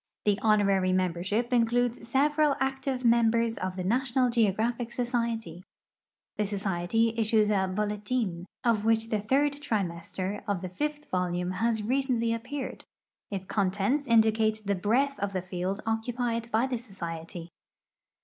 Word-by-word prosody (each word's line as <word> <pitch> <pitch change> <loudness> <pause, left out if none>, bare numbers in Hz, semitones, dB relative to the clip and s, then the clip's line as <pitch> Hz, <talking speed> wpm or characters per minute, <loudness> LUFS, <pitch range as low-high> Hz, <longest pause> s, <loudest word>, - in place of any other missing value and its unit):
The 205 0 +2
honorary 200 -4 +3
membership 185 +6 0
includesseveral 245 +5 +2
active 265 -1 -1
mem 235 -1 +5
bers 230 0 0
of 185 0 -3
the 185 - -3
National 250 +4 +1
Geographic 230 +2 +1
Society. 230 -7 -2 0.7
The 210 - 0
society 200 +3 0
issues 215 -1 +3
a 190 -2 +2
" - - -6
holetin 210 -3 -1
" - - -65
of 215 -2 -1
which 225 0 +2
the 215 - +1
third 275 +7 +2
trimester 195 -6 -3
of 200 -4 -1
the 185 - -5
fifth 295 +9 -3
volume 180 0 -1
has 220 +3 0
recently 245 -1 +1
appeared; 250 +4 -5 0.5
its 195 -2 -4
contents 205 +9 0
indicate 220 -1 +3
the 200 0 +1
Ijreadth 250 +9 +1
of 200 0 -2
the 185 - -1
field 185 +2 -3
occupied 230 +1 -1
hy 225 +3 +3
the 260 -2 -2
so(4ety. 170 -6 -7
220 Hz, 140 wpm, -28 LUFS, 195-240 Hz, 0.7 s, mem